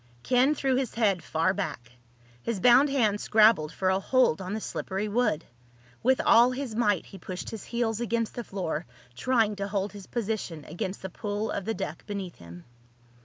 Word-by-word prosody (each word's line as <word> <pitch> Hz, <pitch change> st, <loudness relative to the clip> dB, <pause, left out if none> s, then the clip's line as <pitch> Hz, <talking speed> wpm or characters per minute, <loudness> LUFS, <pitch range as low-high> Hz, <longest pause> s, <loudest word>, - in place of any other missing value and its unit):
Ken 260 Hz, +4 st, +3 dB
threw 265 Hz, -2 st, +1 dB
his 260 Hz, -3 st, -2 dB
head 205 Hz, -6 st, +2 dB
far 165 Hz, +5 st, +1 dB
back. 125 Hz, -, -5 dB, 0.5 s
His 225 Hz, -, -2 dB
bound 250 Hz, +7 st, +6 dB
hands 220 Hz, -7 st, +1 dB
scrabbled 215 Hz, -8 st, +4 dB
for 185 Hz, +2 st, 0 dB
a 190 Hz, -, +2 dB
hold 255 Hz, -5 st, +2 dB
on 185 Hz, +1 st, -4 dB
the -, -, -2 dB
slippery 200 Hz, -1 st, -3 dB
wood. 210 Hz, -7 st, 0 dB, 0.6 s
With 260 Hz, +2 st, +3 dB
all 235 Hz, +2 st, +7 dB
his 255 Hz, -3 st, -4 dB
might 210 Hz, -4 st, +2 dB
he 195 Hz, -, -12 dB
pushed 185 Hz, +1 st, -6 dB
his 220 Hz, -, -7 dB
heels 235 Hz, -2 st, -1 dB
against 230 Hz, -1 st, -1 dB
the 240 Hz, -, -5 dB
floor, 175 Hz, -6 st, -4 dB, 0.3 s
trying 225 Hz, -, +2 dB
to 200 Hz, 0 st, -2 dB
hold 200 Hz, 0 st, -2 dB
his 200 Hz, -2 st, -10 dB
position 210 Hz, -, -3 dB
against 185 Hz, +3 st, -5 dB
the 190 Hz, -, -4 dB
pull 205 Hz, +3 st, -3 dB
of 195 Hz, -, -3 dB
the 225 Hz, -, -1 dB
deck -, -, -5 dB
beneath 195 Hz, -4 st, -5 dB
him. 85 Hz, 0 st, -12 dB
210 Hz, 185 wpm, -28 LUFS, 190-235 Hz, 0.6 s, all